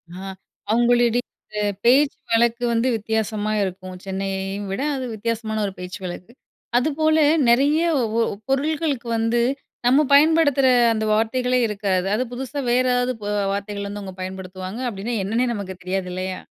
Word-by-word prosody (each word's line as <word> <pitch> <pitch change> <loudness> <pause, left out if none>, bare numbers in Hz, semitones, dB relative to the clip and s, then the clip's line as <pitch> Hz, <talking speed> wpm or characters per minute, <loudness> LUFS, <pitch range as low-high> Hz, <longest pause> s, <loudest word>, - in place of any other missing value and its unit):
ஆ. - - -8 0.5
அவங்களுடைய 240 +1 +3 0.6
பேச்சு 275 +4 +5 0.2
வழக்கு 235 +1 +2
வந்து 230 +2 +1
வித்தியாசமா 215 -1 -1
இருக்கும், 185 -1 -5
சென்னையையும் 195 +1 -3
விட 195 - -2
அது 260 -1 -3
வித்தியாசமான 220 0 -2
ஒரு 195 - -4
பேச்சு 180 +1 -7
வழக்கு. 180 +4 -7 0.5
அதுபோல 310 +4 +2 0.3
நெறைய 280 +6 +4 0.2
ஓ 230 -1 0 0.3
பொருள்களுக்கு 285 -2 0
வந்து 225 +1 +1 0.4
நம்ம 270 +5 +5
பயன்படுத்துற 285 -2 +5 0.3
அந்த 220 -1 -2
வார்த்தைகளே 250 +3 +1
இருக்காது. 195 -3 -1
அது 245 - 0
புதுசா 265 +3 -5
வேற 250 +1 +3
ஏதாவது 245 +1 +1
பொ 205 - -5 0.3
வார்த்தைகள்லருந்து 200 0 -4
அவங்க 190 -2 -8
பயன்படுத்துவாங்க. 185 +2 -6
அப்டின்னா 220 +3 -4
என்னன்னே 225 +6 0
நமக்கு 195 -3 -5
தெரியாது 185 0 -2
இல்லையா? 185 0 -4
225 Hz, 135 wpm, -22 LUFS, 195-250 Hz, 0.6 s, பேச்சு